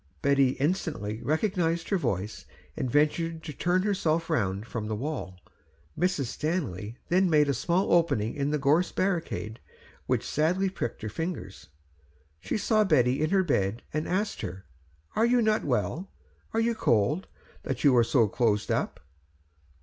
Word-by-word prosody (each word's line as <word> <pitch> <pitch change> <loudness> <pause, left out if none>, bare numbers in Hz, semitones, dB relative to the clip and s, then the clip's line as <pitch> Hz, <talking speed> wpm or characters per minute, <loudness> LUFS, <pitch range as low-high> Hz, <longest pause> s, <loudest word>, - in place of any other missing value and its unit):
Betty 140 -2 +4
instantly 145 - -2
recognised 165 0 0
her 195 - +2
voice, 100 - -3 0.3
and 130 - -2
ventured 160 +4 +1
to 155 - -6
turn 180 +5 +1
herself 170 -5 0
round 100 -7 0
from 115 -3 -4
the 110 - -2
wall. 115 -7 -5 0.6
Mrs. 175 -4 0
Stanley 120 - -3
then 185 +1 +3
made 150 -2 +4
a 140 - +2
small 170 - +1
opening 165 -11 +2
in 140 0 -1
the 150 - +1
gorse 150 +5 +2
barricade, 170 - -2 0.5
which - - 0
sadly 180 +6 +1
pricked 120 - -4
her 110 - -2
fingers; 115 - -5 0.7
she - - -2
saw 215 0 +3
Betty 135 - +3
in 155 - +1
her 195 0 +3
bed 110 - 0
and 155 +1 -1
asked 205 +4 -1
her, 95 +2 -6 0.5
"Are 225 - +3
you 245 +1 +4
not 215 -1 +2
well? 135 - -1 0.4
are 225 - 0
you 230 +1 +2
cold, 145 - +1 0.3
that - - -4
you 140 -4 +6
are 120 - +6
so 115 -1 +3
closed 105 -1 +1
up?" - - -1
150 Hz, 155 wpm, -28 LUFS, 115-180 Hz, 0.7 s, you